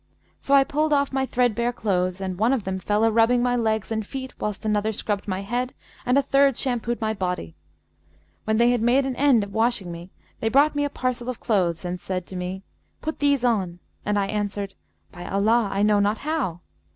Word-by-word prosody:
So 280 - +2
I 275 - +7
pulled 300 +2 0
off 280 -1 +1
my 265 0 0
threadbare 240 -1 +1
clothes 185 -5 -1
and 185 -1 -4
one 230 +5 +3
of 250 -6 -1
them 190 0 -3
fell 210 +3 0
a 225 - +4
rubbing 230 +2 +3
my 245 0 +2
legs 220 -2 0
and 220 -1 -1
feet 260 +4 -7
whilst 210 0 -4
another 210 0 +1
scrubbed 205 -1 -3
my 190 -1 -2
head 245 +5 -3 0.3
and 250 +2 +4
a 280 - +4
third 275 -1 +3
shampooed 240 -2 -1
my 220 -1 -1
body. 180 - -3 0.9
When 220 0 +1
they 235 +1 +4
had 245 -2 +1
made 250 +4 +3
an 265 -2 -2
end 265 -5 +4
of 200 0 -8
washing 220 -5 +1
me, 170 +2 -9 0.3
they 225 - 0
brought 285 +6 +4
me 290 0 0
a - - -1
parcel 255 -2 -2
of 250 - -4
clothes 180 -6 0
and 180 0 -3
said 185 -1 -3
to 190 - -9
me, 180 +1 -4 0.4
'Put 315 0 -4
these 285 -3 +2
on'; 190 -8 0 0.3
and 210 0 0
I 200 - +2
answered, 205 -1 -3 0.4
'By 175 -1 -9
Allah, 215 +2 +2
I 200 - 0
know 210 -1 +4
not 205 +2 +1
how!' 275 - -2
220 Hz, 215 wpm, -24 LUFS, 195-250 Hz, 0.9 s, I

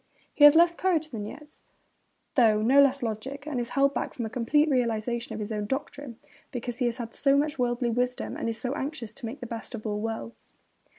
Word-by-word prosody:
He 295 - +6
has 295 +1 +9
less 340 +1 +6
courage 340 -4 0
than 215 -4 -5
Nietzsche, 300 +7 -11 0.7
though 220 -4 +4
no 270 +5 +6
less 275 -1 +3
logic, 250 +6 -4
and 295 -5 -3
is 240 -1 -3
held 275 0 +4
back - - -3
from 235 - -3
a 220 - -6
complete 280 +5 +2
realisation 235 -3 -1
of - - -6
his 210 +1 -5
own 210 -1 -2
doctrine 270 -1 -5 0.3
because 245 -2 -5
he 250 - +2
has 235 0 -3
so 275 +2 +2
much 295 -1 0
worldly 240 0 0
wisdom 250 +2 -1
and - - -2
is 225 - -2
so 255 0 -2
anxious 270 -6 -5
to 240 -1 -6
make 255 +6 -8
the - - -5
best 230 +1 -6
of 215 - -9
all 210 -1 -2
worlds. 225 +1 -6
245 Hz, 220 wpm, -27 LUFS, 225-280 Hz, 0.7 s, has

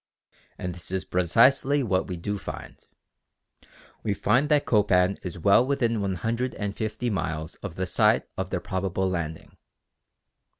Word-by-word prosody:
And 90 -1 -4
this 85 -1 -7
is 95 0 -2
precisely 130 - +3
what 95 -5 0
we 90 - -4
do 105 +4 -3
find. - - -8 1.2
We 105 -2 -1
find 125 +10 +2
that 150 -2 +3
Copan 100 -3 +3
is 90 -1 -6
well 100 +7 +5
within 120 -5 0
150 110 +2 -2
miles 80 -3 -3
of 100 -5 -7
the 95 - -2
site - - +3
of - - -3
their - - -2
probable 95 0 -1
landing. 85 -3 -4
100 Hz, 135 wpm, -26 LUFS, 90-115 Hz, 1.2 s, well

